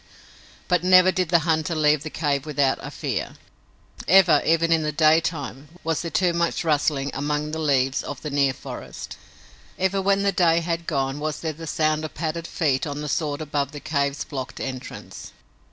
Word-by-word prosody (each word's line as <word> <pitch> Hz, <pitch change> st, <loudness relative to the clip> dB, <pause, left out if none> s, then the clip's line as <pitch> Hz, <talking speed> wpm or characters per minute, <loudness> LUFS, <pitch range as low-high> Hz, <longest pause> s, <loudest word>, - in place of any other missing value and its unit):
But 180 Hz, -2 st, +2 dB
never 185 Hz, 0 st, +6 dB
did 185 Hz, -3 st, -1 dB
the 170 Hz, -, +5 dB
hunter 160 Hz, 0 st, 0 dB
leave 150 Hz, -1 st, +3 dB
the 155 Hz, -, -5 dB
cave 145 Hz, -4 st, -1 dB
without 140 Hz, -3 st, +1 dB
a -, -, -6 dB
fear. -, -, -4 dB, 0.7 s
Ever, 170 Hz, -4 st, +6 dB
even 165 Hz, +1 st, +2 dB
in 165 Hz, -1 st, +4 dB
the 150 Hz, 0 st, -1 dB
daytime, 155 Hz, -3 st, +1 dB, 0.2 s
was 165 Hz, -1 st, -1 dB
there 170 Hz, -, -4 dB
too 180 Hz, 0 st, +1 dB
much 170 Hz, 0 st, 0 dB
rustling 145 Hz, -3 st, +1 dB
among 150 Hz, +2 st, -2 dB
the 160 Hz, -, -3 dB
leaves 135 Hz, -3 st, +1 dB
of 145 Hz, -3 st, -6 dB
the 150 Hz, -, -4 dB
near 140 Hz, -1 st, +2 dB
forest. -, -, -8 dB, 0.6 s
Ever 190 Hz, +1 st, +1 dB
when 200 Hz, +1 st, +2 dB
day 170 Hz, -2 st, +3 dB
had 170 Hz, 0 st, -3 dB
gone 135 Hz, -1 st, -1 dB
was 155 Hz, 0 st, -3 dB
there 160 Hz, -1 st, -2 dB
the 165 Hz, +2 st, -9 dB
sound 155 Hz, 0 st, 0 dB
of 155 Hz, -, -6 dB
padded 165 Hz, +1 st, -3 dB
feet 145 Hz, -2 st, 0 dB
on 145 Hz, 0 st, -4 dB
the 150 Hz, -, -4 dB
sward 150 Hz, 0 st, -1 dB
about 145 Hz, -2 st, -2 dB
the 145 Hz, -, -6 dB
cave's 140 Hz, -1 st, -1 dB
blocked 135 Hz, -3 st, -6 dB
entrance. 130 Hz, -1 st, -7 dB
155 Hz, 185 wpm, -24 LUFS, 145-165 Hz, 0.7 s, never